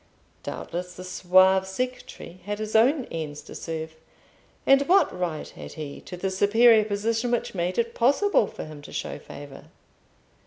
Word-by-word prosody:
Doubtless 180 +1 -6
the 180 - -8
suave 185 +1 +4
secretary 250 -4 -5
had 205 0 -3
his 215 0 -5
own 255 +4 +4
ends 150 -3 -5
to - - -11
serve; 160 -1 -5 0.7
and 275 0 +6
what 375 - +4
right 175 -4 -3
had - - -10
he 150 -3 -7
to 180 - -7
the 190 +2 -2
superior 220 +3 +5
position 225 +3 -1
which 240 -1 -1
made 180 0 -2
it 235 0 0
possible 275 - +3
for - - -8
him 155 -1 -10
to - - -12
show - - -4
favour? 140 -1 -11
190 Hz, 160 wpm, -25 LUFS, 170-230 Hz, 0.7 s, and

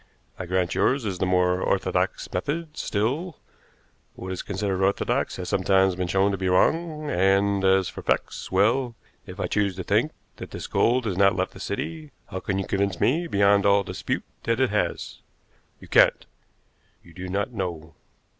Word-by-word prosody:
I 90 - -5
grant 90 -1 0
yours 130 -2 +1
is 95 -4 -3
the 95 - +1
more 90 0 +2
orthodox - - 0
method; 150 - -3
still, 140 - -2 0.8
what 95 - -7
is 95 - -3
considered 95 -1 -2
orthodox 95 +1 0
has 90 -1 -6
sometimes 95 0 +2
been 90 0 -2
shown 95 +2 +2
to 95 - -3
be 95 -1 0
wrong; 155 - +1
and 95 +1 +2
as 95 -1 +4
for - - -7
facts - - -2
well, 115 +6 +2 0.3
if - - -10
I - - 0
choose 100 -3 0
to 95 - -5
think 110 - +1 0.3
that - - -8
this - - -7
gold 120 +1 +2
has 95 -5 -2
not 100 -1 +4
left 95 0 -1
the - - -12
city, 155 +7 -4 0.2
how 95 - -3
can 95 0 -2
you 95 - -2
convince 100 -1 -1
me 165 +8 +2
beyond 100 -5 +3
all 100 0 +4
dispute - - -3 0.2
that 115 +1 0
it 130 -5 +2
has? 105 - -2 0.6
You - - -13
can't. - - +4 0.8
You 85 - -17
do 95 +1 -7
not 100 +5 -1
know. 85 -6 -5
100 Hz, 180 wpm, -25 LUFS, 95-115 Hz, 0.8 s, as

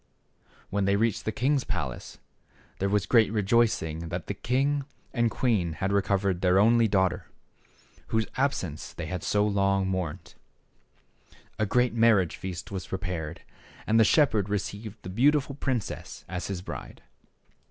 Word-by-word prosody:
When 100 0 +1
they 100 +1 +3
reached 110 0 0
the 110 - 0
king's 130 +5 +1
palace, 75 - -5 0.6
there 100 - 0
was 105 -1 +1
great 110 -2 +4
rejoicing 105 -7 +1
that 90 0 -4
the - - -3
king 135 +6 0 0.3
and 120 -2 +2
queen 105 -9 0
had 95 +5 -2
recovered 100 -2 +1
their 90 0 +4
only 115 +3 +5
daughter, 95 -3 +1 0.8
whose 110 -1 +1
absence 95 - -2
they 85 - -5
had 90 +2 -4
so 105 +5 +1
long 100 -2 +1
mourned. 90 -2 -4 1.3
A 110 - +1
great 125 +3 +2
marriage 115 -7 +3
feast 90 -1 -6
was 95 -3 -5
prepared, 90 -4 -4 0.4
and 110 +1 +3
the - - +7
shepherd 110 - +3
received 105 +1 -4
the 90 - -6
beautiful 140 +7 +2
princess 130 -5 -4
as 90 +1 -4
his 95 -3 -4
bride. - - -8
100 Hz, 145 wpm, -27 LUFS, 90-115 Hz, 1.3 s, the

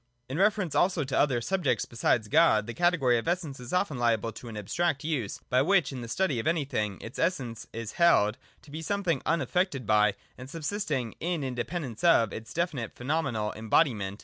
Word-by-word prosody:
In 135 +6 -4
reference 200 -4 +2
also 180 -3 +2
to 135 - -3
other 130 -5 +2
subjects 180 +1 0
besides 115 -1 0
God 130 -6 +4
the 120 - -6
category 155 -9 +2
of 115 - -7
Essence 165 -6 -2
is 125 -1 -8
often 175 -7 0
liable 115 -2 +1
to 115 +3 -11
an 110 -2 -7
abstract 140 - -1
use, 140 -10 -2
by 125 +1 +3
which, 175 -2 +3
in 130 -2 -6
the 115 - -6
study 145 0 0
of 115 - -3
anything, 135 - -1
its 115 - -8
Essence 130 -10 -2
is 115 -1 -5
held 130 -10 +3 0.2
to 145 - -15
be 155 +2 -5
something 175 -4 -1
unaf 160 -6 0
fected 180 - 0
by, 105 -1 +3 0.2
and 130 +1 -9
subsisting 150 - -3
in 170 -3 -2
independence 130 0 -4
of, 120 - +4
its 110 0 -8
definite 155 -9 -2
pheno 145 +6 0
menal 110 -7 -3
embodiment. 110 -3 +1
135 Hz, 195 wpm, -28 LUFS, 115-170 Hz, 0.2 s, God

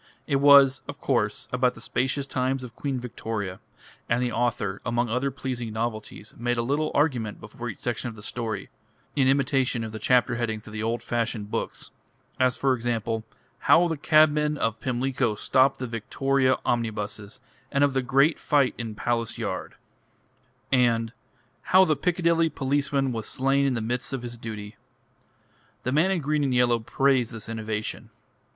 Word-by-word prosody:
It 140 - +1
was, 140 -1 +7
of - - -7
course, - - 0
about 125 0 +2
the - - -11
spacious 135 +4 -1
times 130 0 -1
of 120 -2 -9
Queen 135 -3 -2
Victoria; 110 -6 -5 0.5
and 120 - +2
the 125 -1 0
author, 110 -4 -1
among 120 0 0
other 125 +4 0
pleasing 125 -4 -4
novelties, 110 -2 -4
made 120 0 0
a 115 - +1
little 145 +5 0
argument 130 -8 +1
before 120 +3 -7
each 105 - -7
section 120 0 -3
of 115 - -10
the 105 - -12
story, 110 -4 -4 0.4
in 135 -3 +3
imitation 135 -3 +2
of 110 - -5
the 110 - -6
chapter 125 +1 +3
headings 110 -3 -3
of 105 - -10
the 110 - -4
old 115 +1 -1
fashioned 115 -3 -2
books: - - -3 0.5
as 130 -1 +3
for 135 -1 +2
example, 115 -2 -2 0.4
"How 175 +1 +5
the 165 - -1
Cabmen 150 0 +3
of 115 -4 -1
Pimlico 125 -2 0
stopped 130 +5 +3
the 130 - -4
Victoria 130 +3 +1
Omnibuses, 105 -3 -2 0.3
and 140 - +2
of 140 -1 +3
the 135 - +1
Great 135 +5 +3
Fight 140 -4 +2
in 115 -2 -5
Palace 115 0 -1
Yard," - - -4 1.0
and 115 -3 +2 0.5
"How 190 +1 +5
the 155 - +2
Piccadilly 165 +1 +2
Policeman 140 -1 0
was 110 -3 -3
slain 135 +1 +2
in 130 - 0
the 115 - -2
midst 125 +4 -2
of 130 -2 -3
his 120 -1 -5
Duty." 110 -2 -7 1.1
The 130 - -1
man 155 +7 +3
in 190 -3 0
green 150 +1 0
and 130 -3 +1
yellow 120 -1 +3
praised 130 +1 +1
this 110 -2 -7
innovation. 110 -1 -4
125 Hz, 170 wpm, -26 LUFS, 115-135 Hz, 1.1 s, was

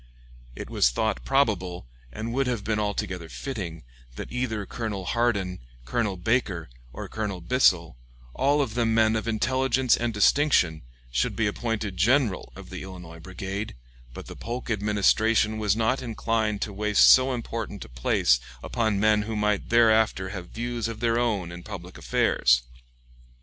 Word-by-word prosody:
It - - -7
was - - +3
thought 105 - -1
probable, 100 - 0 0.3
and 115 - -5
would 135 +1 +1
Have 120 -5 -2
been 105 0 -1
altogether 95 -5 -3
fitting, 90 - -6 0.3
that - - -7
either 115 -5 -2
Colonel 105 -4 -4
Hardin, 100 -5 0 0.3
Colonel 100 - -1
Baker, 95 - -1 0.2
or - - -7
Colonel 105 -4 -4
Bissell, 85 - +2 0.4
all 145 +2 +2
of 115 -5 -5
them 115 -1 +1
men 110 -1 +4
of 110 - -2
intelligence 130 +3 +2
and 120 0 -1
distinction, 105 - +3 0.3
should - - 0
be 115 - +1
appointed 105 -2 -2
general 115 +1 +2
of - - -11
the - - -6
Illinois 90 -3 -10
Brigade, 95 +4 -5 0.4
but - - -9
the - - -9
Polk 120 +1 -5
Administration 105 +1 +2
was 105 -2 +2
not 115 +4 +1
inclined 110 -3 -1
to 105 - -5
waste 105 0 +4
so 130 +1 +7
important 115 -4 -5
a - - -15
place - - +2 0.2
upon 110 -4 0
men 105 0 +4
who 110 +1 -4
might 105 -1 0
thereafter 110 -4 +3
have 90 -3 -7
views 120 -1 -3
of 115 -1 -6
their 115 0 +1
own 105 -8 -1
in 85 0 -8
public - - -9
affairs. - - +2
110 Hz, 155 wpm, -26 LUFS, 95-115 Hz, 0.4 s, so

